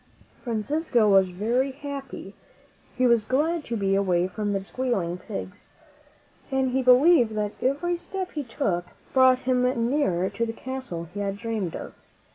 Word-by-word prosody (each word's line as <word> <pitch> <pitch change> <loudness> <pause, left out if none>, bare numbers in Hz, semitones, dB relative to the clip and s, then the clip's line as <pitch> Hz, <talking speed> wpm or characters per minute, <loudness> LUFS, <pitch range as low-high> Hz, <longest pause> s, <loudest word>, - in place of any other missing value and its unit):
Francisco 240 +1 +1
was 195 -2 +5
very 235 +9 0
happy. 275 -7 -7 0.6
He 255 - +3
was 235 -3 +4
glad 300 +8 0
to 235 - -3
be 195 -1 +1
away 185 -3 +2
from 205 +2 -3
the 200 - +1
dirty, 195 - -7
squealing 195 -9 -2
pigs, 200 -1 -8 0.8
and 265 -1 +1
he 265 +1 +1
believed 255 -2 +5
that 210 -1 -1
every 345 +7 0
step 375 +1 -5
he 300 - -3
took 215 -8 -2 0.3
brought 260 -1 +5
him 250 -1 +1 0.3
nearer 190 - +1
to 230 - -2
the 225 -1 -2
castle 245 -10 -6
he 205 - -5
had 200 -1 -2
dreamed 215 -6 -3
of. - - -7
235 Hz, 160 wpm, -25 LUFS, 200-265 Hz, 0.8 s, was